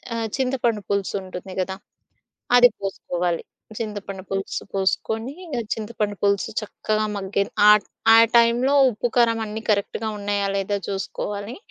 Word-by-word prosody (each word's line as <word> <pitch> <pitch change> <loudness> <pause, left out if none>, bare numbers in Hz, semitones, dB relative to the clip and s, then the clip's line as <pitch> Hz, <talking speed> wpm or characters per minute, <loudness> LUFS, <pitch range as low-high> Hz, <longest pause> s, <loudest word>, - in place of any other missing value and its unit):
ఆహ్, 225 -1 -1
చింతపండు 250 -4 0
పులుసుంటుంది 190 -2 -3
గదా! 190 +1 -3 0.8
అది 245 0 +8
పోసుకోవాలి. 180 -3 -2 0.3
చింతపండు 205 -3 -5
పులుసు 195 0 -3
పోసుకొని 220 +5 -1
ఇగ 310 -7 -5 0.2
చింతపండు 210 -2 -3
పులుసు 200 +2 +1
చక్కగా 215 0 -2
మగ్గే 200 0 -1 0.3
ఆ - - +11 0.4
ఆ - - +9 0.2
టైంలో 240 +4 +4 0.2
ఉప్పు, 240 +2 -2
కారం 230 -2 +4
అన్నీ 215 +1 -5
కరెక్ట్‌గా 210 +1 0
ఉన్నాయా 205 0 -1
లేదా 195 +1 -1
జూసుకోవాలి 200 +2 -4
205 Hz, 125 wpm, -23 LUFS, 195-230 Hz, 0.8 s, ఆ